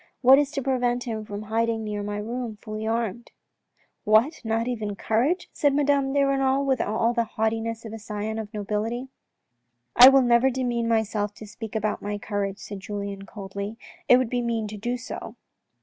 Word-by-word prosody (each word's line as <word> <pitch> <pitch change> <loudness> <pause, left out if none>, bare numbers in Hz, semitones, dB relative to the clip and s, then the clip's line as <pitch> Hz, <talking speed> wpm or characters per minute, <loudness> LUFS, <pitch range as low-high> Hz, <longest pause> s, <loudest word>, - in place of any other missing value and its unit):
What 265 +2 +8
is 290 -1 +1
to 275 - -2
prevent 245 -2 0
him 220 -3 -4
from 205 0 -6
hiding 225 +1 0
near 210 -1 -3
my 205 0 -3
room 230 +1 -4
fully 215 +1 -5
armed? 230 0 -2 0.3
" - - -55
" - - -41
What, 225 +9 +3
not 225 +1 0
even 215 -5 -3
courage? 260 - 0
" - - -46
said 285 -2 +2
Madame 280 -1 +2
de 280 0 +3
Renal, 275 0 +2
with 265 -2 +1
all 225 +3 +1
the 235 -1 +2
haughtiness 225 +1 -1
of 220 - -7
a 225 - -6
scion 215 +1 -4
of 215 -1 -6
nobility. 220 +4 -3 0.4
" 120 0 -51
I 250 +2 +11
will 270 -1 +5
never 240 +2 +4
demean 240 -2 -1
myself 215 -2 0
to 215 - -10
speak 220 +1 -8
about 215 -1 -1
my 205 0 -3
courage," 200 -1 -3
said 205 -2 -8
Julien, 200 0 -6
coldly, 200 +1 -6 0.2
" - - -27
it 250 - +9
would 255 -3 -1
be 245 -1 0
mean 230 -2 -1
to 215 - -7
do 240 +4 -2
so. 250 - -7
225 Hz, 205 wpm, -25 LUFS, 210-245 Hz, 0.4 s, I